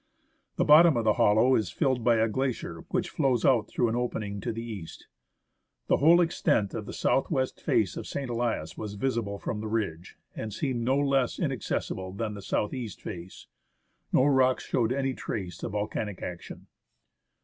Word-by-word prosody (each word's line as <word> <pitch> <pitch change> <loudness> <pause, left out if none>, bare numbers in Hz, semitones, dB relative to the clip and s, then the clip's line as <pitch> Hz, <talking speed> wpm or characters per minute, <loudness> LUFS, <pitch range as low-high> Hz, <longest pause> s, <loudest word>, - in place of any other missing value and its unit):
The - - +1
bottom 155 -1 +7
of 115 - +1
the 110 -1 +4
hollow 110 +5 +5
is 110 -8 +1
filled 130 - 0
by 120 0 +4
a 110 0 +3
glacier 115 -9 -3
which - - -1
flows 130 -4 +1
out 115 -6 +4
through 120 - 0
an 115 - -1
opening 105 -5 -3
to 115 - -2
the 115 +1 -5
east. 105 -8 -8 0.8
The - - +4
whole 170 +4 +6
extent 150 - +1
of 105 -2 -5
the - - -5
south 135 - +1
west 130 -5 -1
face - - +1
of - - -6
St. 140 -2 -4
Elias 115 -9 -2
was 105 -1 -6
visible 115 -3 -2
from 105 +1 -4
the 110 - -4
ridge, 100 -7 -3 0.2
and 110 - -5
seemed 125 +2 -2
no 130 +4 +2
less 135 -3 +1
inaccessible 95 0 -3
than 105 +1 -3
the 100 - -8
south 105 +2 -1
east 120 -7 -5
face. 85 +1 -8 0.7
No 130 - +4
rocks 130 -2 +3
showed 120 -2 0
any 135 0 0
trace 95 -7 -5
of 110 - -4
volcanic 105 -1 -3
action. 85 -1 -7
115 Hz, 180 wpm, -28 LUFS, 105-130 Hz, 0.8 s, bottom